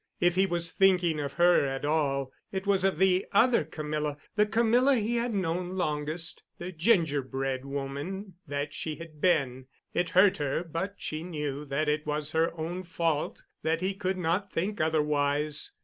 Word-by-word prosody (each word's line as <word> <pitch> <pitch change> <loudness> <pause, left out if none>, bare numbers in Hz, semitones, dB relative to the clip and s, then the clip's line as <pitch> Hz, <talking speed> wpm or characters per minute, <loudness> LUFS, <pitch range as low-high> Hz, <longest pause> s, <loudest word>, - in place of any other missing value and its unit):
If 175 0 +3
he 190 +2 +3
was 170 -1 0
thinking 180 -5 +3
of 140 -1 -3
her 175 -1 +5
at 135 0 -2
all, 140 -3 0 0.2
it 190 0 -3
was 195 -2 +2
of 195 -4 +2
the 185 +1 +3
other 235 -1 +4
Camilla—the 150 +6 -2
Camilla 235 +5 +3
he 230 +1 0
had 235 +1 0
known 180 -2 -2
longest—the 160 +2 -3
gingerbread 140 - +1
woman 140 +8 -5
that 145 +1 -3
she 155 -1 -4
had 155 -2 -11
been. 135 -8 +1 0.3
It 175 -1 0
hurt 190 0 +6
her, 145 +2 -1
but 175 +4 -4
she 155 0 -4
knew 150 -4 -4
that 145 +2 -1
it 150 0 0
was 150 0 -1
her 160 +1 +2
own 170 +3 -3
fault 165 -4 -2 0.2
that 160 +2 0
he 190 +2 0
could 190 -1 -2
not 180 +3 -1
think 195 +3 -2
otherwise. 150 -1 +1
165 Hz, 165 wpm, -28 LUFS, 150-185 Hz, 0.3 s, hurt